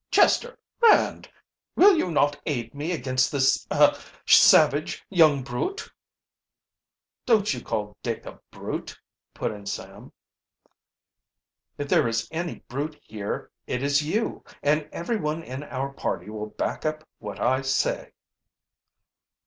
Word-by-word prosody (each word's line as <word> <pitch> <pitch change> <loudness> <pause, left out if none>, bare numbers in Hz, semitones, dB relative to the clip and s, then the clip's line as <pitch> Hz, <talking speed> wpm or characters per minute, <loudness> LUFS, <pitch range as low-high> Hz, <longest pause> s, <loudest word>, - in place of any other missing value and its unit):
"Chester 485 +1 +3 0.2
Rand 460 -2 +4 0.5
will 390 +1 +7
you 185 - 0
not 145 -3 +1
aid 120 -7 -2
me 145 +4 -4
against 130 -5 0
this 135 -1 +2
er - - +5 0.3
savage 150 +4 +5
young 155 -7 +5
brute?" 135 - -4 1.3
"Don't 215 - +3
you 125 - -6
call 105 -2 -3
Dick 115 -2 -4
a - - -10
brute," - - -6 0.4
put - - -2
in 105 -1 -10
Sam. - - -7 1.7
"If 145 - -4
there 120 - +3
is 115 0 -1
any 170 0 -4
brute 145 +5 -4
here 105 -2 -5 0.2
it 125 - -2
is 140 +1 +3
you, 205 +10 -2 0.2
and 150 +1 +1
everyone 165 -4 -2
in 130 0 -6
our 140 -1 -4
party 100 -6 -4
will 105 0 -5
back - - -3
up 155 0 -3
what 105 -2 -7
I 130 +1 +2
say." 135 +1 -1
145 Hz, 130 wpm, -25 LUFS, 125-160 Hz, 1.7 s, will